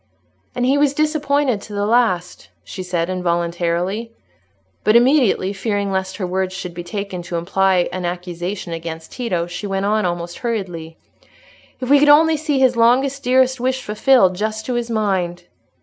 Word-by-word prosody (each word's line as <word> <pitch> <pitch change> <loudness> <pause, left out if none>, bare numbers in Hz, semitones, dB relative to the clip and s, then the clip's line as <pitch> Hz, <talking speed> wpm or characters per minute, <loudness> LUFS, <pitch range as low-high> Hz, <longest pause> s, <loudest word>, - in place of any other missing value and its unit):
"And 245 - 0
he 275 +3 +3
was 285 -1 +2
disappointed 290 -6 +1
to 210 - -10
the 205 0 -1
last," 210 -6 0
she 190 - -7
said, 175 -2 -2
involuntarily. 175 +4 -1 0.7
But 215 - +3
immediately 240 -6 +3
fearing 200 -1 -2
lest 190 0 -2
her 190 - -2
words 185 +1 -2
should 180 -2 -6
be 175 0 -6
taken 200 0 -5
to 175 0 -6
imply 185 +1 +1
an 185 - -4
accusation 175 +1 -4
against 165 -1 -7
Tito, 205 -10 -2
she 180 +4 -6
went 195 0 -1
on 215 +1 +1
almost 175 -1 -3
hurriedly, 180 -9 -4 0.8
"If 255 +1 -3
we 285 - +7
could 295 +1 +4
only 315 +2 +6
see 300 -2 -1
his 260 -2 +3
longest, 260 +4 +3
dearest 255 +1 +3
wish 260 +1 -1
fulfilled 210 -3 +3
just 215 +2 -3
to 255 - -2
his 240 -1 -2
mind!" 190 -6 -1
200 Hz, 165 wpm, -19 LUFS, 180-250 Hz, 0.8 s, we